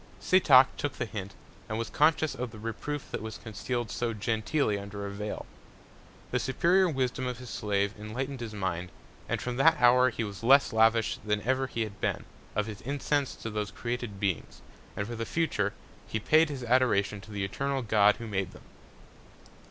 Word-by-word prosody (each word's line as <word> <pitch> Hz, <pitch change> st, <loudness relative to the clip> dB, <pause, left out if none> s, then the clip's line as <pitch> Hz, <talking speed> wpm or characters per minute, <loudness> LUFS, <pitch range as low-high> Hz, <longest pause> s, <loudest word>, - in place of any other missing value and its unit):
Setoc 140 Hz, -8 st, +7 dB
took 145 Hz, -, -2 dB
the 120 Hz, -, -3 dB
Hint, 100 Hz, -3 st, -6 dB, 0.3 s
and 110 Hz, -, -2 dB
was 115 Hz, 0 st, -3 dB
conscious 155 Hz, 0 st, +3 dB
of 125 Hz, 0 st, -4 dB
the 110 Hz, -, -11 dB
Reproof 115 Hz, +6 st, -5 dB
that -, -, -3 dB
was 110 Hz, 0 st, -6 dB
conceal'd 120 Hz, +1 st, -4 dB
so 120 Hz, -1 st, -1 dB
genteely 110 Hz, +1 st, 0 dB
under 100 Hz, 0 st, -6 dB
a 100 Hz, -, -4 dB
Vail. 105 Hz, +1 st, -5 dB, 0.9 s
The -, -, +1 dB
superior 175 Hz, +8 st, +3 dB
Wisdom 130 Hz, -3 st, -1 dB
of 125 Hz, -1 st, -3 dB
his 125 Hz, -1 st, -9 dB
Slave 100 Hz, -1 st, 0 dB
enlightned 130 Hz, +6 st, -4 dB
his 115 Hz, -3 st, -6 dB
Mind; 90 Hz, -3 st, -2 dB, 0.4 s
and -, -, 0 dB
from 125 Hz, -1 st, -4 dB
that 160 Hz, +4 st, +5 dB
Hour 125 Hz, +1 st, +6 dB
he 115 Hz, -1 st, -3 dB
was 100 Hz, -2 st, -6 dB
less 135 Hz, +1 st, +5 dB
lavish 115 Hz, 0 st, +3 dB
than 105 Hz, -1 st, -1 dB
ever 130 Hz, +2 st, +1 dB
he 115 Hz, -, -3 dB
had 105 Hz, -2 st, -8 dB
been, -, -, -1 dB, 0.3 s
of 105 Hz, 0 st, +1 dB
his 105 Hz, -2 st, -7 dB
Incense 140 Hz, +1 st, -1 dB
to 115 Hz, -, -6 dB
those 105 Hz, -1 st, -2 dB
created 120 Hz, -1 st, -4 dB
Beings, 95 Hz, -5 st, -2 dB, 0.3 s
and 105 Hz, -, -1 dB
for 120 Hz, +2 st, -5 dB
the 115 Hz, -, -3 dB
future, 115 Hz, -9 st, 0 dB, 0.4 s
paid 155 Hz, +9 st, +4 dB
his 135 Hz, -4 st, -5 dB
Adoration 115 Hz, -5 st, +2 dB
to 110 Hz, -, -14 dB
the 100 Hz, -2 st, -2 dB
eternal 135 Hz, +6 st, -2 dB
God 105 Hz, -2 st, +4 dB
who 115 Hz, -, -8 dB
made 100 Hz, -4 st, -2 dB
them. -, -, -14 dB
115 Hz, 185 wpm, -29 LUFS, 105-130 Hz, 0.9 s, Setoc